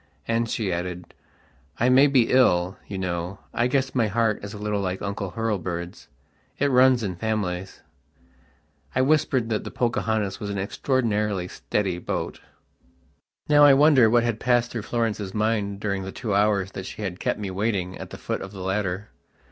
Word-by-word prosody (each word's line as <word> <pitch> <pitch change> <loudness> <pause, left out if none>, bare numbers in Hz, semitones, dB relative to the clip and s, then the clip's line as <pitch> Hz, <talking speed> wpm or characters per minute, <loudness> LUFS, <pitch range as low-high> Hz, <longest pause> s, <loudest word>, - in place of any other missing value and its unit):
And 115 0 0
she 100 -6 -1
added: 90 0 -5 0.7
"I 120 - +3
may 135 +3 +6
be 130 -4 +3
ill, 95 -8 +3
you 100 - -5
know. 90 0 -3 0.2
I 120 - +2
guess 135 +1 0
my 120 -4 +2
heart 110 0 0
is 100 - -6
a 105 - -8
little 105 -1 -2
like 95 -1 -2
Uncle 100 -2 -4
Hurlbird's. 90 -6 -3 0.5
It 145 0 +1
runs 125 -1 +5
in 95 -3 -2
families." 95 -3 -3 1.1
I 130 - +3
whispered 130 -5 +2
that 110 -2 -1
the - - -6
"Pocahontas" 110 -4 -1
was 105 - -5
an 100 - -3
extraordinarily 105 -3 0
steady 95 -1 -2
boat.... - - -4 1.1
Now 145 0 +6
I 145 -2 +8
wonder 140 -5 +6
what 120 +1 +4
had 120 -2 -1
passed 120 -1 +2
through 115 - -3
Florence's 110 -4 -1
mind 105 -2 0
during 100 -2 -2
the 95 0 -6
two 110 -2 -3
hours 100 -2 +2
that 95 0 -6
she 110 - -7
had 90 -2 -4
kept - - -1
me 100 -2 -4
waiting 95 -2 -1
at - - -7
the - - -8
foot - - -4
of 95 - -7
the 95 - -8
ladder. 95 +1 -2
105 Hz, 180 wpm, -24 LUFS, 95-120 Hz, 1.1 s, I